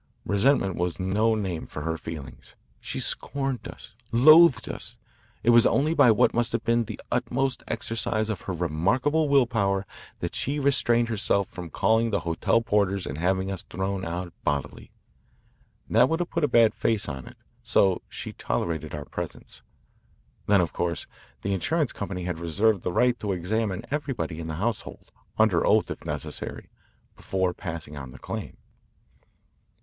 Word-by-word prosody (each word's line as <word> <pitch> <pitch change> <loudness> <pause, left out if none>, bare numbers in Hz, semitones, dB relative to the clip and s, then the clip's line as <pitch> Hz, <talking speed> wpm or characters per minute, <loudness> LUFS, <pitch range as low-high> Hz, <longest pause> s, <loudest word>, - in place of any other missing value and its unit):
Resentment 100 -1 +2
was 90 +1 -1
no 105 +4 +2
name 95 -6 -3
for 75 - -6
her 80 +1 -1
feelings. 70 -6 -9 0.2
She - - -4
scorned 135 -3 0
us, - - -11 0.2
loathed 155 +5 +7
us. - - -6 0.5
It 120 - +5
was 120 -1 +7
only 150 +4 +2
by 130 - +6
what 110 - +4
must 120 -1 0
have 115 - -1
been 115 0 +2
the 110 -1 -7
utmost 130 +1 0
exercise 110 -1 -1
of 105 - -5
her 95 - -4
remarkable 100 - +1
will 140 -2 +5
power 100 -4 0 0.3
that - - -4
she 140 +3 -1
restrained 120 -4 +2
herself 100 -2 +1
from 90 -3 -8
calling 115 +6 +2
the 100 - 0
hotel 85 +7 +1
porters 100 -3 +1
and 70 - -5
having 95 +2 0
us 95 - -4
thrown 95 0 -3
out 85 +1 -4
bodily. 70 -2 -3 1.0
That 120 +4 +4
would 165 - 0
have 175 - -3
put 170 - -1
a - - +4
bad 115 -4 +5
face 110 -4 0
on 65 -2 -6
it, - - -13 0.2
so 95 -2 +2
she - - -7
tolerated 80 +4 -3
our 75 -1 -6
presence. - - -7 0.9
Then, 100 -2 +5
of 85 - -2
course, 85 -3 -2 0.4
the 100 - 0
insurance 150 - 0
company 95 -3 -5
had 90 -2 -3
reserved 100 +5 +1
the 90 - -2
right 125 +5 +2
to 105 -2 -2
examine 95 +2 -2
everybody 135 - -3
in 80 - -5
the 80 - -4
household, 110 +6 -4 0.3
under - - +3
oath - - +3
if - - -7
necessary, - - -5 0.5
before 95 -2 -1
passing 80 -4 -6
on 65 -2 -7
the 65 - -12
claim. - - -6
100 Hz, 165 wpm, -26 LUFS, 85-120 Hz, 1.0 s, loathed